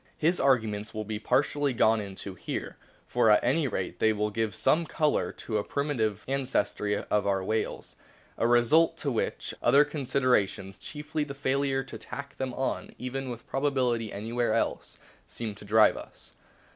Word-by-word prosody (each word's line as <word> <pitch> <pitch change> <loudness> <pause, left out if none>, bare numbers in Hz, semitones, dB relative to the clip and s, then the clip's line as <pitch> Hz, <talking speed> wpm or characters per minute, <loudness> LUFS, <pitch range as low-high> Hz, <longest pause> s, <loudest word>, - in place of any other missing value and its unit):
His 170 +3 +2
arguments 110 -6 +1
will 110 - -2
o - - -3
o 110 +1 -5
be 105 - -3
partly 145 +4 +1
gone 110 -2 +3
into 100 -1 -6
here; 90 - -5 0.3
for 120 -2 +2
at 105 - +5
any 140 +5 +2
rate 95 -6 -3
they 110 - +4 0.2
give 110 -2 -1
some 165 +1 +2
colour 150 -1 +1
to 110 -2 -3
a - - -2
primitive 115 -8 -1
ancestry 130 -6 0
of 105 -1 0
our 95 -1 +1
whales, 110 +3 -2 0.4
a 115 - +1
result 150 +8 +4
to 145 -3 -2
which 115 - -2
other 145 +1 +6
considerations 125 -9 0
chiefly 150 0 -4
the 140 -2 -7
failure 135 -1 0
to - - -9
tack 140 0 -8
them 130 -1 -2
on 130 - -3
even 130 +1 -4
with 120 -2 -7
probability 130 -5 0
any 110 +4 -6
where 120 -1 +1
else - - -2 0.3
seem 115 -3 -5
to 105 0 -13
drive 110 +1 +5
us. - - -11
120 Hz, 170 wpm, -28 LUFS, 110-140 Hz, 0.4 s, other